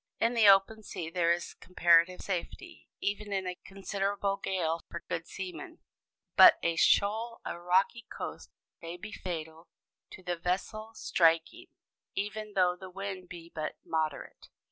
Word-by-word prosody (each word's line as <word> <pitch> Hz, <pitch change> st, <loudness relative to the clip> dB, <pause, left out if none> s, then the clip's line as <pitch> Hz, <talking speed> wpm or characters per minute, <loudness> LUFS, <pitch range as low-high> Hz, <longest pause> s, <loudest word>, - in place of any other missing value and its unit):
In 230 Hz, +1 st, +2 dB
the 225 Hz, -3 st, +5 dB
open 195 Hz, +3 st, +5 dB
sea 165 Hz, -5 st, -6 dB
there 170 Hz, -1 st, +2 dB
is 170 Hz, 0 st, -1 dB
comparative 175 Hz, 0 st, +3 dB
safety, 265 Hz, -, -5 dB
even 205 Hz, +1 st, -2 dB
in 190 Hz, -1 st, -1 dB
a 180 Hz, -1 st, -5 dB
considerable 195 Hz, 0 st, -2 dB
gale, 165 Hz, -4 st, -1 dB
for 170 Hz, -, -6 dB
good 165 Hz, -, -3 dB
seamen; 320 Hz, -, -7 dB, 0.6 s
but -, -, +9 dB
a 170 Hz, 0 st, +1 dB
shoal 220 Hz, +7 st, +2 dB
or 170 Hz, -, -5 dB
rocky 190 Hz, +6 st, +2 dB
coast -, -, -7 dB, 0.3 s
may 170 Hz, +1 st, -7 dB
be 195 Hz, -, -8 dB
fatal 165 Hz, -2 st, -6 dB, 0.4 s
to 190 Hz, -, -12 dB
the 175 Hz, -1 st, -2 dB
vessel 205 Hz, +6 st, -3 dB
striking, 165 Hz, -4 st, +2 dB, 0.5 s
even 210 Hz, +1 st, -4 dB
though 180 Hz, -2 st, +3 dB
the 185 Hz, +1 st, -10 dB
wind 190 Hz, -1 st, -6 dB
be 170 Hz, -1 st, -10 dB
but 155 Hz, -1 st, -4 dB
moderate. 155 Hz, -2 st, -3 dB
185 Hz, 145 wpm, -30 LUFS, 170-205 Hz, 0.6 s, but